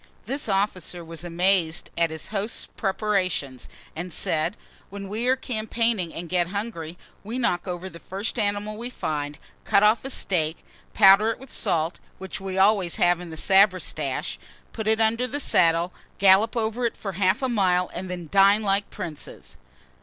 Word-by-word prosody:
This 275 Hz, -3 st, -3 dB
officer 185 Hz, -3 st, -1 dB
was 165 Hz, 0 st, -7 dB
amazed 175 Hz, -1 st, +1 dB
at 170 Hz, -1 st, +2 dB
his 160 Hz, 0 st, -5 dB
host's 210 Hz, +1 st, -2 dB
preparations, 190 Hz, -, -2 dB, 0.3 s
and 175 Hz, +3 st, -5 dB
said, 165 Hz, +6 st, 0 dB, 0.3 s
"When 200 Hz, 0 st, -7 dB
we 220 Hz, +5 st, -2 dB
are 260 Hz, -, +4 dB
campaigning, 225 Hz, -6 st, -1 dB
and 170 Hz, +2 st, -7 dB
get 175 Hz, 0 st, +1 dB
hungry, 180 Hz, -4 st, -5 dB, 0.3 s
we 225 Hz, +5 st, -5 dB
knock 180 Hz, -8 st, 0 dB
over 180 Hz, +1 st, -4 dB
the 170 Hz, -3 st, -11 dB
first 200 Hz, +7 st, -4 dB
animal 205 Hz, 0 st, -1 dB
we 240 Hz, +2 st, -4 dB
find, 150 Hz, -, -4 dB, 0.3 s
cut 200 Hz, -, +3 dB
off 215 Hz, +2 st, +4 dB
a 270 Hz, -, -5 dB
steak, 165 Hz, -, -1 dB, 0.3 s
powder 200 Hz, +1 st, +7 dB
it 225 Hz, -, -2 dB
with 265 Hz, 0 st, -12 dB
salt, 165 Hz, +1 st, 0 dB, 0.2 s
which 190 Hz, 0 st, -7 dB
we 190 Hz, -1 st, -4 dB
always 195 Hz, -3 st, +3 dB
have 175 Hz, 0 st, +3 dB
in 180 Hz, -1 st, -8 dB
the 160 Hz, -, -8 dB
sabretasche, 190 Hz, +1 st, +2 dB, 0.3 s
put 220 Hz, -2 st, -4 dB
it 220 Hz, 0 st, +3 dB
under 225 Hz, +3 st, +2 dB
the 285 Hz, +4 st, -3 dB
saddle, 170 Hz, -, +3 dB, 0.2 s
gallop 200 Hz, +5 st, +5 dB
over 225 Hz, +2 st, -1 dB
it -, -, -7 dB
for 195 Hz, -, -5 dB
half 190 Hz, +5 st, +1 dB
a -, -, +2 dB
mile, 185 Hz, -6 st, +1 dB
and 185 Hz, +1 st, -5 dB
then 175 Hz, -2 st, -5 dB
dine 200 Hz, +2 st, +5 dB
like 200 Hz, 0 st, +1 dB
princes." 170 Hz, -7 st, -8 dB
195 Hz, 170 wpm, -25 LUFS, 175-215 Hz, 0.3 s, powder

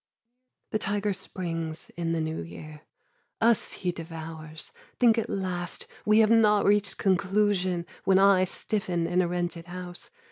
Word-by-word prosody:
The 215 Hz, -, 0 dB
tiger 205 Hz, 0 st, -1 dB
springs 165 Hz, -4 st, -4 dB
in 165 Hz, 0 st, -2 dB
the 165 Hz, -, 0 dB
new 160 Hz, -, -2 dB
year. 150 Hz, -, -10 dB, 0.6 s
Us 230 Hz, 0 st, +2 dB
he 180 Hz, -, -2 dB
devours. 160 Hz, -2 st, -8 dB, 0.3 s
Think 235 Hz, -2 st, +5 dB
at 225 Hz, -, -3 dB
last 180 Hz, -2 st, -3 dB, 0.2 s
We 215 Hz, 0 st, +5 dB
have 220 Hz, 0 st, +4 dB
not 210 Hz, -2 st, +5 dB
reached 205 Hz, 0 st, +2 dB
conclusion, 190 Hz, -2 st, +1 dB, 0.2 s
when 190 Hz, -1 st, +4 dB
I 195 Hz, -1 st, +5 dB
Stiffen 180 Hz, -3 st, -2 dB
in 180 Hz, +2 st, +2 dB
a 180 Hz, -, +1 dB
rented 175 Hz, -1 st, -3 dB
house. 175 Hz, 0 st, -7 dB
180 Hz, 145 wpm, -27 LUFS, 165-205 Hz, 0.6 s, Think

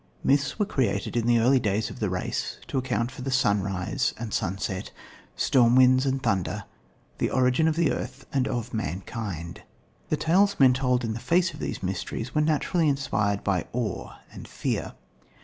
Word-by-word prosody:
Myths 140 Hz, 0 st, +2 dB
were 210 Hz, -, +1 dB
created 120 Hz, -, -1 dB
in 120 Hz, -1 st, +1 dB
the 120 Hz, 0 st, +5 dB
early 125 Hz, +4 st, +4 dB
days 105 Hz, -1 st, -1 dB
of -, -, -10 dB
the 105 Hz, -, 0 dB
race 90 Hz, -1 st, -3 dB
to 135 Hz, -, 0 dB
account 125 Hz, -2 st, -1 dB
for 135 Hz, +1 st, -5 dB
sunrise 100 Hz, -7 st, 0 dB
and 115 Hz, -2 st, -5 dB
sunset, 95 Hz, +1 st, -2 dB, 0.5 s
storm 120 Hz, -2 st, +4 dB
winds 130 Hz, +1 st, +5 dB
and 135 Hz, 0 st, -1 dB
thunder, 100 Hz, -6 st, 0 dB, 0.6 s
the -, -, +1 dB
origin 130 Hz, +4 st, +2 dB
of 160 Hz, -, +1 dB
the 170 Hz, -2 st, +2 dB
earth 130 Hz, +2 st, -5 dB
and 135 Hz, -2 st, +1 dB
of 120 Hz, -1 st, -3 dB
mankind. 95 Hz, -3 st, -4 dB, 0.5 s
The 155 Hz, -, +1 dB
tales 190 Hz, +7 st, +3 dB
men 130 Hz, -2 st, +7 dB
told 125 Hz, -1 st, +1 dB
in 110 Hz, -1 st, -1 dB
the 115 Hz, -, -5 dB
face 175 Hz, +6 st, +2 dB
of -, -, -10 dB
these -, -, -4 dB
mysteries 95 Hz, +6 st, -4 dB
were 150 Hz, -, +2 dB
naturally 155 Hz, +2 st, +2 dB
inspired 110 Hz, -8 st, 0 dB
by 95 Hz, -3 st, 0 dB
awe 115 Hz, -5 st, -3 dB, 0.2 s
and -, -, -9 dB
fear. -, -, -3 dB
125 Hz, 175 wpm, -26 LUFS, 105-135 Hz, 0.6 s, men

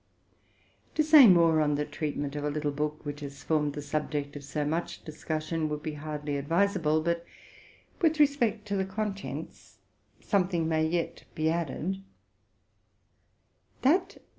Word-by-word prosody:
'To 310 Hz, -, +3 dB
say 300 Hz, -4 st, +9 dB
more 165 Hz, -4 st, +5 dB
on 150 Hz, -1 st, +2 dB
the 150 Hz, +1 st, -1 dB
treatment 145 Hz, -2 st, -3 dB
of 145 Hz, -, -3 dB
a 150 Hz, -, 0 dB
little 145 Hz, 0 st, -1 dB
book 150 Hz, +2 st, -3 dB
which 145 Hz, 0 st, -5 dB
has 140 Hz, -1 st, -8 dB
formed 150 Hz, -2 st, +1 dB
the 145 Hz, -1 st, -6 dB
subject 145 Hz, -1 st, -3 dB
of 145 Hz, -, -7 dB
so 145 Hz, +1 st, -2 dB
much 165 Hz, +3 st, -3 dB
discussion 155 Hz, +1 st, -3 dB
would 150 Hz, 0 st, -4 dB
hardly 150 Hz, 0 st, -5 dB
be 140 Hz, -, 0 dB
advisa 185 Hz, +6 st, +1 dB
ble; 155 Hz, 0 st, +2 dB
but, 170 Hz, +1 st, -1 dB, 0.8 s
with 320 Hz, -2 st, +3 dB
respect 240 Hz, -8 st, +2 dB
to 200 Hz, -, -1 dB
the 190 Hz, -, +1 dB
contents, 200 Hz, +1 st, -5 dB, 0.4 s
something 180 Hz, -5 st, +1 dB
may 160 Hz, -1 st, +1 dB
yet 170 Hz, +1 st, -2 dB
be 160 Hz, 0 st, +1 dB
added. 170 Hz, +3 st, -2 dB
155 Hz, 145 wpm, -29 LUFS, 150-190 Hz, 0.8 s, say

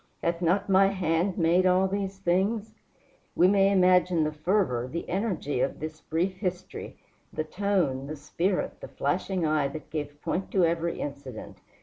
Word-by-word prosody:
Hath 170 Hz, 0 st, 0 dB
not 180 Hz, +3 st, +2 dB
my 195 Hz, 0 st, +5 dB
hand 180 Hz, -1 st, 0 dB
made 175 Hz, +2 st, +3 dB
all 185 Hz, +1 st, +4 dB
these 195 Hz, 0 st, -3 dB
things?" 200 Hz, +4 st, 0 dB, 0.6 s
We 180 Hz, -, +5 dB
may 195 Hz, 0 st, +4 dB
imagine 180 Hz, -3 st, +4 dB
the 155 Hz, -, 0 dB
fervor, 155 Hz, -, 0 dB
the 170 Hz, -, -4 dB
energy 180 Hz, -, -1 dB
of 135 Hz, -, -1 dB
this 155 Hz, 0 st, -6 dB
brief 180 Hz, +4 st, -1 dB
history, 185 Hz, -2 st, -5 dB, 0.3 s
the 155 Hz, -, -2 dB
tone, 165 Hz, -7 st, 0 dB
the 155 Hz, -, -5 dB
spirit, 175 Hz, -, -2 dB
the -, -, -7 dB
flashing 185 Hz, -, -1 dB
eye 155 Hz, -2 st, +2 dB
that 155 Hz, +3 st, -9 dB
gave 145 Hz, -2 st, -5 dB
point 190 Hz, +2 st, -2 dB
to 185 Hz, -3 st, +4 dB
every 170 Hz, 0 st, -1 dB
incident. 140 Hz, -5 st, -7 dB
180 Hz, 160 wpm, -27 LUFS, 155-195 Hz, 0.6 s, my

